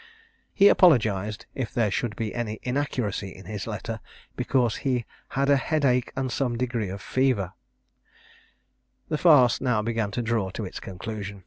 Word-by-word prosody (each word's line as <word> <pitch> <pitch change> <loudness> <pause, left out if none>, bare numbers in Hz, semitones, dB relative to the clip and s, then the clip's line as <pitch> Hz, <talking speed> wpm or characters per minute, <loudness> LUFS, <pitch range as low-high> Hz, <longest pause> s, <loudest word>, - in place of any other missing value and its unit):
He 200 -2 +6
apologized, 110 - +4
if 130 -4 -3
there 110 -4 +2
should 105 0 -2
be 110 -1 -3
any 110 -2 -3
inaccuracy 125 -7 -2
in 95 0 -12
his 105 +2 -5
letter, 110 +1 -4 0.4
because 125 -4 +1
he 125 -4 -1 0.3
had 140 0 +2
a 140 0 +5
head 155 +1 0
ache 125 -2 +2
and 130 -1 -2
some 125 -3 -1
degree 120 -5 -1
of 95 0 -7
fever. 125 -6 +1 1.6
The 155 - -1
farce 145 -8 +6
now 125 -5 +1
began 115 -2 -1
to 120 +4 -3
draw 115 -4 0
to 105 +2 -5
its 90 - -7
conclusion. 100 +1 -6
115 Hz, 160 wpm, -26 LUFS, 105-130 Hz, 1.6 s, He